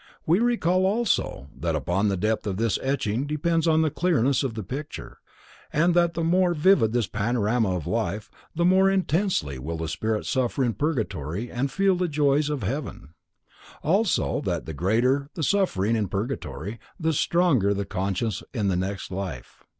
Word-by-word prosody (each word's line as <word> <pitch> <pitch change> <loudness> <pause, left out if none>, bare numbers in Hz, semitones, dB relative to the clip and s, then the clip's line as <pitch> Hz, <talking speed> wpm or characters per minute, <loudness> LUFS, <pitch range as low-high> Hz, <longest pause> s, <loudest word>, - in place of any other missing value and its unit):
We 170 +5 +3
recall 190 -6 +2
also, 200 - -1
that 85 -1 -2
upon 90 +8 0
the 100 -1 0
depth 110 +3 -1
of 95 -2 -2
this 115 -1 0
etching 130 -1 -1
depends 165 +2 0
the 160 -1 +3
clearness 140 -7 +2
of 130 -5 -2
the 110 - -4
picture, 135 - -7 0.5
and 170 +4 +3
that 170 -1 +2
the 165 - -1
more 175 +1 +3
vivid 150 - +4
this 120 -1 +1
panorama 110 -1 0
of 85 -5 -4
life, 105 -2 -2 0.2
the 170 +1 +1
more 190 +2 +5
intensely 175 - 0
will 80 +5 -4
the 80 0 -3
spirit 110 +6 -2
suffer 130 +1 0
in 120 -2 +1
purgatory 110 - -2
and 130 +3 -1
feel 195 -1 +2
the 180 0 0
joys 145 -1 +2
of 145 -6 -2
heaven; 115 - -5 0.7
also, 180 - +1
that - - -2
the 80 - -6
greater 120 - +1
the 165 - -3
suffering 115 - +1
in 105 -3 0
purgatory 110 +1 -4 0.2
the 160 -1 +1
stronger 150 - +2
the 100 0 -1
conscience 100 +2 -2
in 105 -4 +1
the 95 - +1
next 95 +2 -3
life. 90 -10 -6
125 Hz, 170 wpm, -25 LUFS, 100-165 Hz, 0.7 s, more